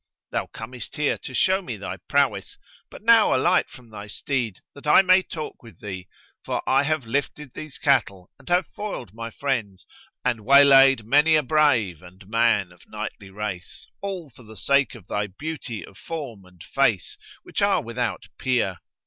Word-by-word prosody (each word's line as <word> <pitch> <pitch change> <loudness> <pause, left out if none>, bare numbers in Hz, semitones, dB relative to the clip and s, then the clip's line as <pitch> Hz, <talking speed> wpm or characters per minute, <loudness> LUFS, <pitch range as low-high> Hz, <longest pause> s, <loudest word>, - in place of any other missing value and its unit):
Thou - - -2
comest 115 +1 -8
here 150 -1 0
to 130 - -8
show 190 +7 +3
me 120 - -6
thy 100 -1 -6
prowess; - - +1 0.3
but - - -13
now 230 - +6
alight 130 - +2
from 120 -3 -15
thy 105 -1 -8
steed, 115 -1 -3
that 140 +1 -11
I 150 - +7
may 185 0 +5
talk 155 -4 -7
with 115 -3 -15
thee, 95 -3 -7 0.4
for - - -3
I - - +4
have 150 -2 -1
lifted 140 +2 -3
these 155 -3 -8
cattle 110 - +1
and - - -14
have 180 0 +3
foiled 160 - -7
my 115 +1 -6
friends 115 -8 -3 0.4
and 120 -4 0
waylaid 135 -1 +7
many 150 +6 +5
a 155 - +3
brave 125 - +2
and 90 +1 -15
man 115 -4 +2
of 90 - -20
knightly 100 - -7
race, 95 -3 -6
all 185 -7 -5
for 120 - -17
the 110 -2 -13
sake 140 +4 +2
of 110 -7 -13
thy 105 0 -2
beauty 120 - -6
of 95 - -17
form 135 - -7
and 90 -2 -16
face, - - +1 0.3
which - - -4
are - - +3
without 120 0 -3
peer. 115 -9 0
125 Hz, 175 wpm, -24 LUFS, 105-150 Hz, 0.4 s, I